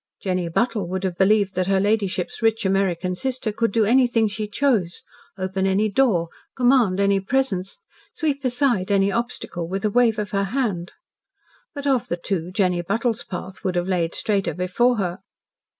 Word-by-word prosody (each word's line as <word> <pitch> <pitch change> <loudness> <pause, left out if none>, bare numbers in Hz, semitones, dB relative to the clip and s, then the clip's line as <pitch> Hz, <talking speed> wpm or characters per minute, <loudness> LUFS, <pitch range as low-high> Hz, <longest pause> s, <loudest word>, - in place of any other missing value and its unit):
Jenny 185 -3 -2
Buttle 210 +1 0
would 190 +2 -3
have 185 -2 -1
believed 200 +1 +3
that 185 0 -1
her 195 -1 +3
ladyship's 200 -2 -1
rich 225 -1 +1
American 190 -2 +1
sister 255 +2 -2
could 225 +1 0
do 220 0 +2
anything 240 -1 +3
she 210 +1 -4
chose, 210 -7 0 0.3
open 190 0 -1
any 200 +3 +2
door, 200 -7 +2 0.3
command 245 -7 +3
any 200 0 +3
presence, 195 -4 -1 0.4
sweep 285 -4 -1
aside 245 -6 +1
any 200 0 +3
obstacle 230 -7 -3
with 195 +3 -3
a 210 - +1
wave 240 -1 +3
of 210 -1 -3
her 200 -1 0
hand. 200 -6 -2 0.8
But 285 0 -6
of 265 -6 +1
the 175 - -2
two, 175 -1 -3
Jenny 185 -3 +1
Buttle's 225 +6 -1
path 185 0 -8
would 185 -2 -1
have 175 +1 0
laid 175 -3 0
straighter 200 -7 -1
before 205 +8 +1
her. 180 -3 -2
200 Hz, 170 wpm, -22 LUFS, 185-235 Hz, 0.8 s, believed